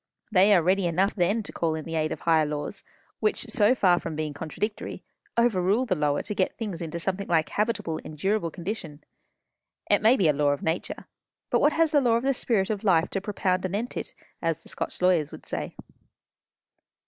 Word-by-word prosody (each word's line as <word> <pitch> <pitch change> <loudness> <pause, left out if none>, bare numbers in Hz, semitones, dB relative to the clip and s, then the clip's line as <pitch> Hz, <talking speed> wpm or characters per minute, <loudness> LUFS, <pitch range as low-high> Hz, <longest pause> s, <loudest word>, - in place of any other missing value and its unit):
They 200 +1 +5
are 175 - +3
ready 185 +1 +2
enough 185 +4 +1
then 200 +5 +1
to - - -7
call 160 -2 -1
in 155 - -6
the 165 - -6
aid 155 -1 0
of - - -5
higher 160 -2 +3
laws, 150 -1 -4 0.4
which, 430 - 0
so 220 +2 +4
far 180 -7 +4
from 165 -2 -5
being 155 -1 -3
contradictory, 165 +8 -5 0.3
overrule 220 0 +2
the 220 - +1
lower 150 -4 0
to 210 - -3
get 190 -2 -1
things 205 -8 -4
into 170 0 -4
something 190 +3 -2
like 160 -2 +2
habitable, 210 -7 -1
endurable 170 +4 -1
condition. 170 -4 -6 0.9
It 205 - +4
may 225 +5 +5
be 185 - +3
a 150 - +4
law 145 0 +2
of 145 - -6
nature; 160 +2 -3 0.5
but - - +3
what 295 - +4
has 325 -1 +2
the 290 - +4
Law 240 -3 +3
of 235 - 0
the 275 0 +2
Spirit 220 -5 +1
of 210 -1 -3
Life 175 -5 +3
to 195 - -2
propound 190 -2 -1
anent 205 +6 -3
it? - - -5 0.3
as 165 -1 -1
the - - -13
Scotch - - -5
lawyers 170 -5 +3
would - - -11
say." - - -4
185 Hz, 205 wpm, -26 LUFS, 160-210 Hz, 0.9 s, They